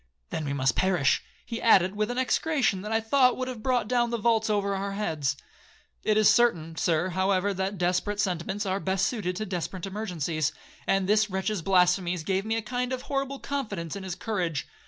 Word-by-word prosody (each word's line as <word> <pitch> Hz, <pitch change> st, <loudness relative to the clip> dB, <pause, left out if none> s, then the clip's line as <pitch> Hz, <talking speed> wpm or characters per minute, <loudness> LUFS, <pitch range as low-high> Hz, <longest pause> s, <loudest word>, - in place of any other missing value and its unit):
'—'Then 155 Hz, -, -3 dB
we 140 Hz, -, -2 dB
must 135 Hz, -3 st, +1 dB
perish,' 180 Hz, -7 st, +2 dB, 0.2 s
he 230 Hz, -1 st, -5 dB
added, 190 Hz, -4 st, +5 dB
with 215 Hz, +1 st, 0 dB
an 245 Hz, -, -3 dB
execration 260 Hz, -5 st, +1 dB
that 210 Hz, +2 st, -6 dB
I 225 Hz, -, +3 dB
thought 250 Hz, +3 st, +3 dB
would 255 Hz, -, -2 dB
have 250 Hz, -4 st, -6 dB
brought 245 Hz, -3 st, +1 dB
down 240 Hz, 0 st, +2 dB
the 235 Hz, -, -1 dB
vaults 225 Hz, 0 st, +2 dB
over 200 Hz, -1 st, +1 dB
our 195 Hz, +1 st, -3 dB
heads. 150 Hz, -9 st, -1 dB, 0.7 s
It 215 Hz, -1 st, +2 dB
is 215 Hz, -1 st, +5 dB
certain, 165 Hz, -10 st, +3 dB
Sir, 170 Hz, +2 st, +1 dB
however, 190 Hz, +2 st, +1 dB
that 190 Hz, +1 st, -2 dB
desperate 185 Hz, +4 st, 0 dB
sentiments 190 Hz, +2 st, -1 dB
are 190 Hz, 0 st, 0 dB
best 190 Hz, -1 st, 0 dB
suited 190 Hz, -7 st, -2 dB
to 215 Hz, -, -3 dB
desperate 185 Hz, -1 st, -4 dB
emergencies, 175 Hz, -7 st, -2 dB, 0.3 s
and 195 Hz, -1 st, +2 dB
this 210 Hz, +1 st, +3 dB
wretch's 190 Hz, +1 st, -2 dB
blasphemies 180 Hz, -1 st, +2 dB
gave 190 Hz, +4 st, -1 dB
me 225 Hz, +1 st, 0 dB
a 225 Hz, -, -2 dB
kind 245 Hz, +3 st, -2 dB
of 255 Hz, -1 st, -3 dB
horrible 275 Hz, -1 st, -2 dB
confidence 210 Hz, -, -4 dB
in 200 Hz, -, -5 dB
his 185 Hz, -2 st, -5 dB
courage. 180 Hz, -8 st, -2 dB
200 Hz, 200 wpm, -27 LUFS, 180-225 Hz, 0.7 s, added